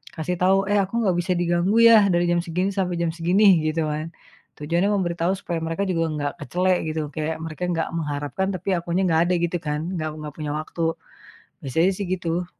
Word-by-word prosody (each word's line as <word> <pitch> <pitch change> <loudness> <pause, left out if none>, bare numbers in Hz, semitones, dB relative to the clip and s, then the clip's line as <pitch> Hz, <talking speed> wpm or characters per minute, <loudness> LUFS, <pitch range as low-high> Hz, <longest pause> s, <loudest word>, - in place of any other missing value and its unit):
kasih 175 +2 -2
tahu, 190 +1 +4
"Eh 205 - +4
aku 195 +5 -1
nggak 185 -4 +2
bisa 180 +1 0
diganggu 175 +3 +1
ya 225 -3 +7
dari 175 0 +2
jam 175 - +2
segini 180 +3 -1
sampai 180 -3 -1
jam 170 -1 0
segini," 180 +2 +4
gitu 155 0 0
kan. 155 +2 -4 0.5
Tujuannya 170 +6 0
memberi 180 -4 0
tahu 170 +3 +2
supaya 175 -4 -4
mereka 165 +4 -2
juga 165 -3 0 0.2
ga 145 0 -1
kecele 180 +4 +1
gitu, 155 0 -2
kayak 160 0 -3
mereka 160 +2 -6
ga 165 -1 -1
mengharapkan 150 +3 -2
tapi 190 +3 -3
akunya 175 +2 -1
gak 165 -2 +3
ada - - +2
gitu 170 +1 0
kan, 150 0 -2 0.2
gak 155 -1 -3
gak 150 -1 -6
punya 150 -2 -4
waktu. 155 +2 -4 0.8
Biasanya 165 +8 +2
sih 200 +1 -4
gitu. 175 -1 -1
170 Hz, 200 wpm, -23 LUFS, 160-185 Hz, 0.8 s, ya